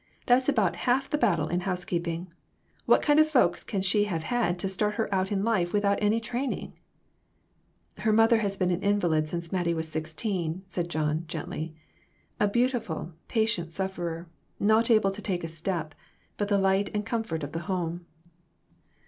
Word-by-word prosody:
That's 255 +2 +4
about 200 -11 +2
half 265 +3 +2
the 300 - +2
battle 170 - +2
in 175 - 0
housekeeping. 175 -2 -3 0.5
What - - +5
kind 295 0 +4
of 310 0 +5
folks 250 - +3
can 195 -3 -2
she 205 +2 +3
have 170 -6 -2
had 205 -3 0
to 185 - -2
start 210 +2 0
her 225 -3 -1
out 190 +1 0
in 195 -1 0
life 195 -6 +1
without 200 -1 +2
any 210 +2 +3
training? 245 +4 -3 0.6
" - - -41
"Her 220 - +2
mother 225 +1 +5
has 200 -2 0
been 185 -1 +1
an 175 +1 -1
invalid 175 -7 +2
since 170 +1 -4
Mattie 175 -2 0
was 160 0 -2
sixteen," 160 +2 -3
John 155 -4 -1
said, - - -25
gently. 160 0 -5 0.6
"A 205 - +4
beautiful, 225 -7 -1
patient 220 -7 0
sufferer; 175 -2 -3 0.3
not 220 +3 +3
able 215 -4 +4
to 205 +2 -8
take 180 -5 -2
a - - -2
step, 165 -1 -3 0.4
but 205 - -1
the 200 -1 +2
light 195 +1 +2
and 210 0 -1
comfort 220 -9 -2
of 145 - -5
the 165 - -3
home." 175 -2 -2
190 Hz, 175 wpm, -28 LUFS, 170-220 Hz, 0.6 s, What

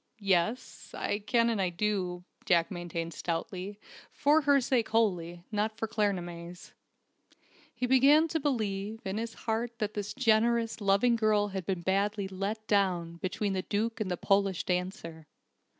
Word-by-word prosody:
"Yes. 200 +3 -1
I 205 - -1
can 235 +2 +2
and 185 -6 -1
do," 185 -4 -1 0.2
Jack 170 -1 +3
maintained 170 -2 -4
stoutly, 185 +5 -4 0.3
for 300 +2 +3
her 285 -1 +4
sake 240 -3 +1
wholly, 175 -6 0
not 215 +1 -1
for 225 - -2
Claremanagh's. 180 -5 -3 1.0
He 250 +1 -3
began 275 +5 +5
to 320 - 0
believe, 220 -6 -2
in 195 +2 -2
his 230 0 -5
heart, 230 +1 -3
that 215 -2 -2
this 205 -1 -4
generous, 230 -2 +2
loving 200 +5 +3
girl 210 -2 +2
had 190 -3 -5
been 185 -3 -1
badly 200 +2 0
"let 200 +3 -4
down," 180 -5 +1
between 195 +3 -2
the 190 - -1
Duke 220 +4 -2
and 200 - -1
the 180 - -1
Polish 195 -1 +1
dancer. 180 -3 -3
205 Hz, 150 wpm, -30 LUFS, 180-225 Hz, 1.0 s, began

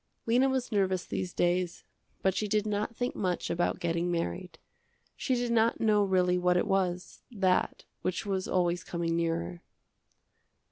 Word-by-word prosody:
Lena 250 +4 +3
was 260 -2 -1
nervous 190 -3 +1
these 185 -1 -3
days, 175 0 0 0.4
but 190 - +3
she 210 +3 -1
did 210 +1 +1
not 210 +2 -2
think 245 +2 -2
much 180 -3 -1
about 175 +2 0
getting 170 0 0
married. 175 0 -3 0.6
She 260 - 0
did 240 -1 -1
not 230 0 +3
know 210 -2 +3
really 180 -2 +2
what 180 0 +3
it - - +2
was, 180 -2 -1
that, 190 -6 0 0.2
which 185 - -2
was 190 -2 -1
always 175 -1 +1
coming 170 -1 -2
nearer. 170 +1 -2
185 Hz, 155 wpm, -30 LUFS, 175-210 Hz, 0.6 s, Lena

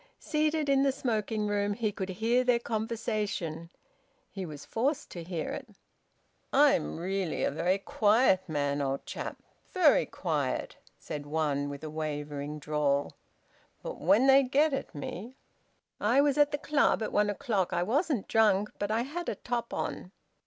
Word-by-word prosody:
Seated 305 -1 0
in 275 -1 +4
the 275 0 +3
smoking 220 -4 -1
room 205 0 0
he 220 -2 -1
could 190 -1 -5
hear 230 +6 +1
their 245 -1 +3
conversation; 215 -8 -3 0.6
he 190 -3 -5
was 150 -2 -9
forced 265 +6 -1
to 175 - -6
hear 165 -2 -4
it. - - -6 0.8
"I'm 75 0 +3
really 185 0 -2
a - - +1
very 175 +6 +1
quiet 205 -2 +3
man, 145 -1 0
old 135 0 -2
chap, - - -5 0.3
very - - +4
quiet," - - -2 0.2
said 145 -1 -7
one, 145 -2 0
with 140 +1 -7
a 155 - -4
wavering 150 -1 -4
drawl, 145 -1 0 0.7
"but - - -6
when 200 +10 +4
they 270 0 +7
get 280 +3 +2
at 270 - -4
me 205 - -6 0.6
I 235 +6 +3
was 285 -1 +4
at 290 -1 +4
the 290 - -1
Club 290 -6 +2
at - - -3
one 210 0 +2
o'clock. 205 -4 -1
I 175 0 +1
wasn't 275 - 0
drunk, 210 -2 +3
but 205 - -1
I 225 +2 +1
had 340 +6 -4
a - - -2
top 240 -1 -3
on." 180 - -4
205 Hz, 160 wpm, -30 LUFS, 160-250 Hz, 0.8 s, they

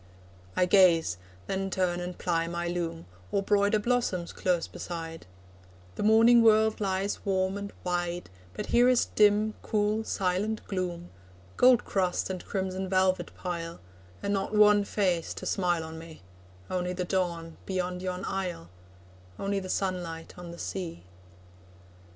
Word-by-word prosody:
I 180 - +3
gaze 175 - +4 0.3
then 195 - -2
turn 180 -2 0
and 180 0 -5
ply 165 -2 0
my 170 0 -3
loom, 170 - -3 0.3
Or 200 - +1
broider 205 +1 +3
blossoms 210 -6 0
close 180 -3 0
beside; 165 - -7 0.7
The - - -6
morning 225 +3 +6
world 220 -1 +4
lies 195 0 -1
warm 190 -1 0
and 200 0 -5
wide, 175 - -2 0.2
But - - -4
here 245 +1 +6
is 250 -1 +4
dim, 210 +1 +3
cool 215 +1 0
silent 205 +2 -1
gloom, 175 -3 -4 0.4
Gold 250 -2 +5
crust 185 -1 0
and 185 -1 -5
crimson 190 -1 -3
velvet 185 -2 +2
pile, 170 -2 -5 0.4
And 200 - 0
not 195 +2 -1
one 210 -1 +6
face 180 -6 0
to - - -7
smile 175 -4 +1
on 160 0 -8
me 160 - -12 0.4
Only 180 0 -2
the 180 0 -3
dawn 170 -3 -2
beyond 180 -1 -2
yon 185 0 -3
isle, 180 - -4 0.7
Only 200 0 -1
the 185 -1 -7
sunlight 175 -4 -3
on 175 -1 -9
the 170 - -9
sea. 170 - -5
185 Hz, 145 wpm, -28 LUFS, 175-200 Hz, 0.7 s, morning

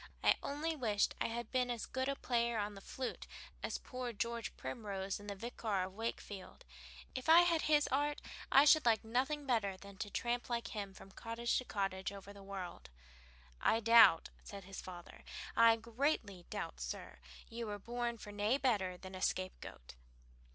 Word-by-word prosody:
"I - - +7
only 310 +3 -2
wished 215 -7 +1
I - - +2
had 235 +1 -4
been 250 -1 +1
as 240 -2 -2
good 260 +1 -2
a 275 - 0
player 235 -3 0
on 205 0 -1
the 195 - -10
flute 255 +5 -5 0.3
as - - -2
poor 250 -1 -5
George 235 +1 -3
Primrose 195 - -4
in 205 - -11
'The 200 - -4
Vicar 215 -2 -2
of 185 0 -6
Wakefield.' 205 -3 -6 0.5
If 260 +3 -4
I 330 +2 +10
had 340 -2 +3
his 300 -1 +4
art, 290 +2 +1 0.3
I 275 +2 +8
should 310 +1 +7
like 225 -2 +4
nothing 265 +6 0
better 215 -7 +1
than 200 0 -12
to 205 - -4
tramp 240 +3 -1
like 235 -1 -1
him 200 -3 -5
from 195 - -12
cottage 230 +3 -2
to 255 - -6
cottage 195 -3 -2
over 200 0 -9
the 200 - -12
world." 195 - -7 0.7
"I 225 - +4
doubt," 230 -6 +7
said 200 -1 -9
the 195 +2 -13
father, 180 -2 -9 0.3
"I 230 0 +7
greatly 225 - -1
doubt, 60 - -4
sir, - - -5 0.3
you 230 0 -5
were 205 -1 -3
born 235 +2 -3
for 210 - -9
nae 205 +5 +2
better 205 -9 +1
than 190 +1 -10
a 185 - -6
scapegoat." 185 - -3
225 Hz, 180 wpm, -36 LUFS, 195-245 Hz, 0.7 s, I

